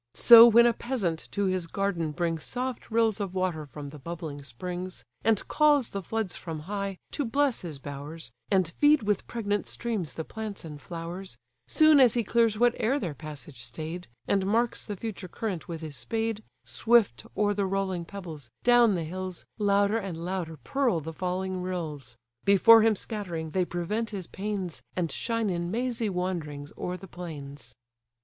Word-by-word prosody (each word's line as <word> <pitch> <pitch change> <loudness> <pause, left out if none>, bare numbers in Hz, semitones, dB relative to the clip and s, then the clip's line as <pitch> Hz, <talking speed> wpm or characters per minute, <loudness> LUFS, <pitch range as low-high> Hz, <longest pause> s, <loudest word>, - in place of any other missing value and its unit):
So 235 0 +10
when 235 +1 +7
a 240 - +5
peasant 210 -10 -2
to 200 -1 0
his 185 -2 0
garden 175 -4 -1
brings 165 0 -1
Soft 255 0 -3
rills 225 -2 +2
of 190 -2 -4
water 175 -5 -1
from 145 0 -8
the 150 +1 -11
bubbling 155 -1 -6
springs, 180 +8 -6 0.2
And 220 -2 +2
calls 295 -5 +4
the 200 - -3
floods 220 +1 -3
from 160 -3 -6
high, 200 +2 -4
to 290 - -1
bless 275 +1 +1
his 160 -5 -6
bowers, 145 0 -8 0.2
And 190 -4 +3
feed 290 - +4
with 205 -2 0
pregnant 205 -3 -2
streams 220 -9 -3
the 160 - -4
plants 215 -5 -6
and 150 -2 -8
flowers: 175 +3 -7 0.3
Soon 310 -2 +6
as 250 -4 +6
he 235 - +2
clears 230 0 +3
whate'er 245 +2 +2
their 175 - -3
passage 145 -3 -9
stay'd, 160 +8 -6 0.2
And 195 -1 +1
marks 230 +3 +1
the 205 - -5
future 200 -2 -6
current 190 -3 -4
with 165 -2 -5
his 155 -3 -7
spade, 220 - -2 0.2
Swift 225 - +2
o'er 205 -1 +3
the 200 -1 0
rolling 190 -2 -1
pebbles, 165 -9 -8
down 240 -4 +6
the 170 - -1
hills, 185 +2 -6
Louder 205 +1 +3
and 195 -6 -5
louder 175 -4 -3
purl 265 -11 +1
the 160 +1 -7
falling 185 +2 -2
rills; 155 -9 -5 0.3
Before 220 +3 +7
him 220 0 +4
scattering, 175 -7 -4
they 185 +1 +1
prevent 210 +7 -2
his 195 -4 -5
pains, 195 -4 -4
And 170 -3 -1
shine 230 -3 -1
in 170 -1 -2
mazy 235 +1 -1
wanderings 165 -6 -3
o'er 180 0 -4
the 195 - -11
plains. 145 -8 -8
185 Hz, 170 wpm, -28 LUFS, 165-220 Hz, 0.3 s, So